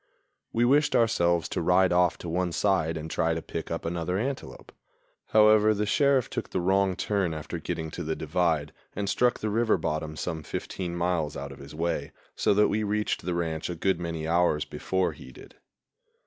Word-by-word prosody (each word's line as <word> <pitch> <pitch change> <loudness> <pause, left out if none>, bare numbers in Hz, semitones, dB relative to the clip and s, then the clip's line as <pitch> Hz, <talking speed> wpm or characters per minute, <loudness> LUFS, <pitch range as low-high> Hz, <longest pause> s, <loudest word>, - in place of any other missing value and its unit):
We 120 +1 +2
wished 145 +3 +3
ourselves 85 -7 +2
to - - -2
ride 90 +2 +4
off 90 -1 +3
to - - -8
one 90 +1 -1
side 85 -5 +1
and 80 0 -5
try 80 0 0
to - - -2
pick 80 - -5
up 85 0 -4
another 85 +2 -2
antelope. 130 +6 -5 0.6
However, 110 0 +5
the 105 +1 0
Sheriff 135 +2 +3
took - - -5
the - - -1
wrong 95 +1 +2
turn 95 -6 -1
after 75 - -5
getting 80 -1 -4
to 90 - -5
the 80 0 -2
divide, 80 -2 0 0.2
and 100 0 -2
struck 120 +4 +1
the 110 - -1
river 115 +1 +2
bottom 80 0 -3
some 80 0 -4
fifteen 85 +3 -5
miles 85 -3 -1
out 70 0 -6
of 70 - -11
his 70 +2 -11
way, 80 -3 -2 0.2
so - - +2
that 105 +1 +5
we 110 - 0
reached 105 0 -1
the 90 - 0
ranch 80 -2 -2
a 90 - -3
good 95 +1 0
many 85 -2 -4
hours 85 -2 +2
before 95 -1 -1
he - - -12
did. - - -15
90 Hz, 195 wpm, -27 LUFS, 80-105 Hz, 0.6 s, However